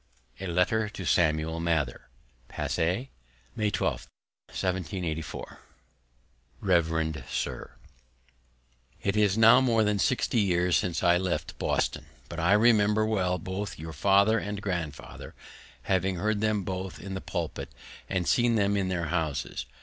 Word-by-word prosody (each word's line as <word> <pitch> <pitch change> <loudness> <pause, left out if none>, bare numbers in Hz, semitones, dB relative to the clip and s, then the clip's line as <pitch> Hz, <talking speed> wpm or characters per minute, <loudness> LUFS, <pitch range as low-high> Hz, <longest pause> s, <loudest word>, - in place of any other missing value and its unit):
A 95 - -4
LETTER 95 +5 +1
TO 95 -3 -7
SAMUEL 80 -1 +2
MATHER 80 -6 -1 0.4
Passy, 90 - -2 0.4
May 105 -1 +1
12, 105 - -2 0.4
1784. 90 -4 -4 1.0
Revd 80 -4 0
Sir, - - -4 1.3
It 100 - 0
is 105 -1 +3
now 115 +3 +7
more 115 -4 +3
than 105 -1 +1
60 125 0 +1
years 90 -3 +2
since 85 -3 0
I 85 0 +5
left 90 -1 -3
Boston, - - -1 0.2
but 85 - -6
I 85 +4 +3
remember 105 -1 +4
well 95 -4 0
both 95 +2 -5
your 80 +1 -7
father 100 +5 +4
and 105 0 -4
grandfather, 85 -8 -5 0.5
having 95 0 +1
heard 105 +4 -1
them 110 -2 +1
both 95 0 -5
in 95 +1 -7
the 95 - -4
pulpit, 85 -4 -4 0.4
and 90 -3 -1
seen 120 -1 +3
them 100 -1 +2
in 95 -2 0
their 90 -2 -1
houses. 75 -6 -2
95 Hz, 135 wpm, -28 LUFS, 85-105 Hz, 1.3 s, now